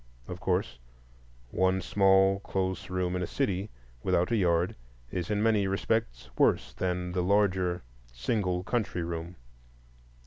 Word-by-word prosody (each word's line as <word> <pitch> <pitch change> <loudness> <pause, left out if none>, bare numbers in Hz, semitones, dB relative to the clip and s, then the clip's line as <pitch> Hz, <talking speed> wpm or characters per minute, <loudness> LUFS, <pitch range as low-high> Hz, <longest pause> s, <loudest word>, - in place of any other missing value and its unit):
Of - - -6
course, 65 - -1 0.7
one 95 0 +2
small, 95 +1 +4
close 95 -2 -3
room 90 -1 -1
in 90 - -1
a 90 - -2
city, 100 +1 -1 0.3
without 90 - +1
a - - +3
yard, 90 -3 +2 0.4
is 90 0 -3
in 105 0 +1
many 110 -3 +3
respects 95 - -1
worse - - +3
than 90 +5 -2
the 90 0 0
larger 95 -3 +2 0.3
single 90 - -1
country 105 -6 -1
room. 85 +1 -5
95 Hz, 135 wpm, -29 LUFS, 90-100 Hz, 0.7 s, small